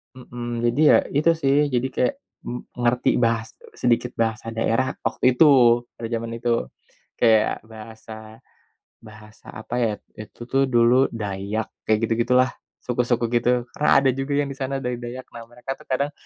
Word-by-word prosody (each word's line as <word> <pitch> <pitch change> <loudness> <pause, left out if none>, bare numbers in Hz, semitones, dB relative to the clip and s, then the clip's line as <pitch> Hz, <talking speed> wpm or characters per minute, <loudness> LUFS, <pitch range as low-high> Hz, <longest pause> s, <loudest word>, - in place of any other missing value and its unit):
Mhm, 120 -2 -6
jadi 125 +6 -1
ya - - +7 0.2
itu 155 +3 +3
sih, 135 -1 +3 0.2
jadi 125 +1 +1
kayak 260 +2 +1 0.3
m 125 - -5 0.2
ngerti 125 0 +1
bahas 115 -2 +1 0.3
sedikit 120 0 0
bahasa 115 0 -2
daerah 115 +3 0
waktu 125 - +1
itu, 140 +6 +5 0.5
pada 115 - -5
zaman 115 0 -3
itu. 120 +1 -3 0.7
Kayak 110 -1 +2
bahasa, 110 0 -11 0.9
bahasa 110 -1 -15
apa 110 +2 -7
ya. 115 -2 +2 0.3
Itu 115 +2 -11
tuh 135 - +3
dulu 120 0 +5 0.2
Dayak, 105 0 -4 0.2
kayak 110 -1 +2
gitu-gitulah, 120 +3 +2 0.3
suku-suku 120 -1 0
gitu. 120 0 +2 0.2
Karena 150 - 0
ada 135 -1 +3
juga 135 +2 -3
yang 145 -1 0
di - - -17
sana 135 +1 -2
dari 125 -2 -3
Dayak. 125 +2 -7
Nah, 115 - -8
mereka 125 +2 -6
tuh - - -18
kadang 140 +2 0
120 Hz, 160 wpm, -23 LUFS, 115-130 Hz, 0.9 s, ya